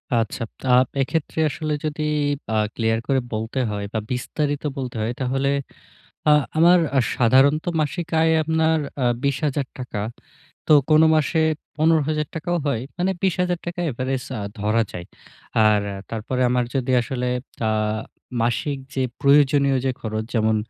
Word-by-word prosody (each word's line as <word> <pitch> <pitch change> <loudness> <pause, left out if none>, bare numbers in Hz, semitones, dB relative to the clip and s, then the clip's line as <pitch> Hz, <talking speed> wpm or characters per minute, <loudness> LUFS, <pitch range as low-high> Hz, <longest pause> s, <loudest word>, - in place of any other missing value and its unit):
আচ্ছা, 115 0 -1 0.3
আ - - +6 0.3
এক্ষেত্রে 160 +3 -2
আসলে 155 +1 -3
যদি 155 0 -3 0.5
আ - - +2 0.2
ক্লিয়ার 115 -1 +1
করে 135 -1 +2
বলতে 110 +4 -3
হয় 100 0 -3
বা 110 - 0
বিস্তারিত 145 +4 -2
বলতে 125 -3 -4
হয় 115 +3 -1
তাহলে, 135 +2 0 0.8
আ - - +7 0.3
আমার 175 +2 +7 0.4
সাধারণত 135 +6 +4 0.2
মাসিক 165 +3 -2
আয় 160 0 +4
আপনার 160 0 +2 0.2
আ - - +2 0.2
২০,০০০ 140 0 0
টাকা। 125 -5 -4 0.7
তো - - +4 0.2
কোন 155 +1 +6
মাসে 155 +1 +1 0.4
১৫,০০০ 155 -1 +2
টাকাও 175 +2 -1
হয়। 120 -4 0 0.2
মানে 185 +2 +1
২০,০০০ 180 -1 +1
টাকা 175 0 -4
এভারেজ 130 +1 -2 0.2
আ - - -4 0.2
ধরা 110 +2 +2
যায়। 85 -1 -7 0.6
আর 105 -1 +4
আ - - -6
তারপরে 115 +3 -3
আমার 125 -1 +2
যদি 130 -1 0
আসলে, 125 0 -3 0.4
আ - - +2 0.7
মাসিক 120 +5 0 0.2
যে 135 - 0 0.2
প্রয়োজনীয় 140 -1 +4
যে 130 - +2
খরচ 110 -1 -3
যেমন; 110 -1 +2
135 Hz, 145 wpm, -22 LUFS, 120-155 Hz, 0.8 s, আ